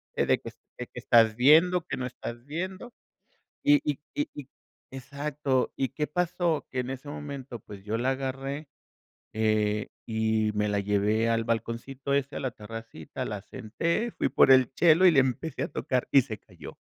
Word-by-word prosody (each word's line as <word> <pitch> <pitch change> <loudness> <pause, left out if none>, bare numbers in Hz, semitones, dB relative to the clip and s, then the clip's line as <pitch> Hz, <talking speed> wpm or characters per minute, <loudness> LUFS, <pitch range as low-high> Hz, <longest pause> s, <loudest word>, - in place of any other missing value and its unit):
de - - +2
que - - -8 0.3
de - - -6
que - - -9
estás 115 -2 +4
viendo, 165 +6 +5
que - - -2
no 130 - -3
estás 120 -1 -7
viendo, 185 +10 -5 0.7
y 290 0 +5
y 140 - -4 0.2
y 295 +1 0
y 145 -2 -8 0.4
exacto, 140 0 -2
¿y 135 - -1
qué 150 +2 -2
pasó? 175 -1 0
Que 130 - -1
en 125 +1 -4
ese 135 +2 -7
momento, 140 -5 -7
pues, 100 -2 -11
yo 110 +2 -1
la 125 +3 +1
agarré, 135 +2 -4 0.7
eh, 110 -1 +1 0.2
y 110 -1 +1
me 105 0 +1
la 105 -1 0
llevé 105 +3 +1
al 115 0 +1
balconcito 115 +4 -3
ese, 140 0 0
a - - -3
la 130 -2 -2
terracita, 115 -7 -8
la - - -4
senté, 170 - -2
fui - - -1
por 135 - +5
el 130 -1 +6
chelo 170 +4 +5
y - - +7
le 135 -4 +6
empecé 130 +5 -2
a - - -1
tocar 125 -1 -1
y 135 - +7
se 110 -4 -6
calló, 85 -8 -13
130 Hz, 180 wpm, -28 LUFS, 110-150 Hz, 0.7 s, y